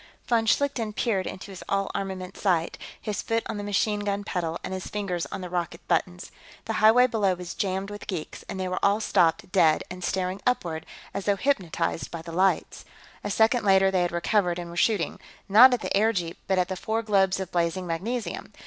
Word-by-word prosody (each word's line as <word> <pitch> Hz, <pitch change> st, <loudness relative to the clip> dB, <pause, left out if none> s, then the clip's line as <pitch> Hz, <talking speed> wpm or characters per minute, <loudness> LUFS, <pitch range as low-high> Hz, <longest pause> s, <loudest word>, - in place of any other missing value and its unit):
Von 230 Hz, -2 st, +1 dB
Schlichten 240 Hz, -5 st, +1 dB
peered 205 Hz, -4 st, 0 dB
into 190 Hz, +2 st, -7 dB
his 190 Hz, -, -9 dB
all 195 Hz, 0 st, 0 dB
armament 190 Hz, -1 st, -4 dB
sight, 175 Hz, -4 st, 0 dB, 0.2 s
his 210 Hz, -2 st, -3 dB
foot 230 Hz, 0 st, -1 dB
on -, -, -4 dB
the 205 Hz, -, -4 dB
machine 205 Hz, +1 st, +1 dB
gun 205 Hz, 0 st, -2 dB
pedal 170 Hz, -4 st, -3 dB
and -, -, -4 dB
his 185 Hz, -1 st, -5 dB
fingers 190 Hz, -5 st, -3 dB
on 195 Hz, -, -6 dB
the 180 Hz, -, -5 dB
rocket 170 Hz, -1 st, -3 dB
buttons. 180 Hz, +1 st, -1 dB, 0.3 s
The 225 Hz, -, -2 dB
highway 225 Hz, +4 st, +7 dB
below 210 Hz, -6 st, +1 dB
was 180 Hz, -1 st, -7 dB
jammed 195 Hz, +1 st, -2 dB
with 205 Hz, -, -8 dB
geeks, 175 Hz, -6 st, -5 dB
and 190 Hz, -, -5 dB
they 185 Hz, -, -1 dB
were 185 Hz, 0 st, -3 dB
all 200 Hz, +2 st, +4 dB
stopped 175 Hz, -4 st, +2 dB
dead 160 Hz, -5 st, +4 dB
and 180 Hz, 0 st, -7 dB
staring 185 Hz, +2 st, -1 dB
upward, 170 Hz, -11 st, -1 dB, 0.3 s
as 200 Hz, 0 st, -4 dB
though 205 Hz, -, +3 dB
hypnotized 190 Hz, -, -1 dB
by 165 Hz, -1 st, -7 dB
the 165 Hz, -, -8 dB
lights. 190 Hz, +3 st, +1 dB, 0.4 s
A -, -, -3 dB
second 220 Hz, +3 st, +3 dB
later, 195 Hz, -1 st, +5 dB
they 185 Hz, -1 st, +2 dB
had 175 Hz, -, 0 dB
recovered 175 Hz, +1 st, +1 dB
and 175 Hz, -1 st, -6 dB
were -, -, -9 dB
shooting 200 Hz, 0 st, +1 dB, 0.3 s
not 230 Hz, +6 st, +8 dB
at 245 Hz, -3 st, 0 dB
the -, -, -1 dB
airjeep, 195 Hz, -5 st, +1 dB
but 190 Hz, 0 st, +2 dB
at 180 Hz, -1 st, +2 dB
the 190 Hz, -, -3 dB
four 220 Hz, +4 st, -2 dB
globes 195 Hz, -3 st, +2 dB
of 190 Hz, -2 st, -5 dB
blazing 175 Hz, +1 st, 0 dB
magnesium. 190 Hz, +4 st, -3 dB
190 Hz, 210 wpm, -26 LUFS, 180-210 Hz, 0.4 s, not